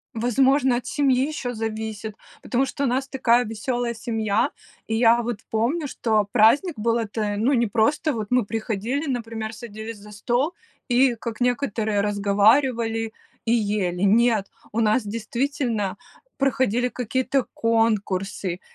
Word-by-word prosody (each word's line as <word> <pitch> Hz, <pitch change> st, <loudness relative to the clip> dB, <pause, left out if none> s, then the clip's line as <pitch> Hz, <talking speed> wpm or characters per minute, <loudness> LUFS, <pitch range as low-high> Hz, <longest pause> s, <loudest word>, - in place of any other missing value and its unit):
Возможно, 260 Hz, +3 st, +3 dB
от 250 Hz, -, -6 dB
семьи 270 Hz, -2 st, +2 dB
ещё 255 Hz, -5 st, -4 dB
зависит. 220 Hz, -1 st, -4 dB, 0.3 s
Потому 260 Hz, +2 st, 0 dB
что 280 Hz, -, -4 dB
у -, -, +2 dB
нас 260 Hz, +2 st, 0 dB
такая 245 Hz, -3 st, +3 dB
весёлая 235 Hz, +2 st, -2 dB
семья, 220 Hz, -1 st, 0 dB, 0.4 s
и 225 Hz, -, -1 dB
я 235 Hz, +1 st, +5 dB
вот 235 Hz, -2 st, -3 dB
помню, 260 Hz, +9 st, 0 dB
что 220 Hz, -5 st, +1 dB
праздник 260 Hz, -, +4 dB
был- 230 Hz, +2 st, +1 dB
это, 210 Hz, -2 st, -2 dB
ну, 240 Hz, +7 st, +2 dB
не 235 Hz, -2 st, +2 dB
просто, 240 Hz, +9 st, +1 dB
вот 215 Hz, -3 st, -4 dB
мы 250 Hz, -1 st, +4 dB
приходили, 225 Hz, +6 st, -2 dB
например, 225 Hz, -3 st, -4 dB
садились 220 Hz, -1 st, -8 dB
за 210 Hz, +1 st, -13 dB
стол 245 Hz, -, 0 dB, 0.3 s
и, 250 Hz, 0 st, +3 dB
как 230 Hz, 0 st, -6 dB
некоторые, 225 Hz, -5 st, 0 dB
разговаривали 225 Hz, +3 st, +2 dB, 0.3 s
и 225 Hz, -, +1 dB
ели. 200 Hz, -6 st, 0 dB
Нет, 215 Hz, 0 st, +3 dB, 0.2 s
у 220 Hz, -, -2 dB
нас 215 Hz, +3 st, +2 dB
действительно 230 Hz, -1 st, -2 dB, 0.4 s
проходили 255 Hz, -3 st, +1 dB
какие-то 255 Hz, +2 st, -1 dB
конкурсы, 205 Hz, -5 st, 0 dB
230 Hz, 140 wpm, -23 LUFS, 215-250 Hz, 0.4 s, я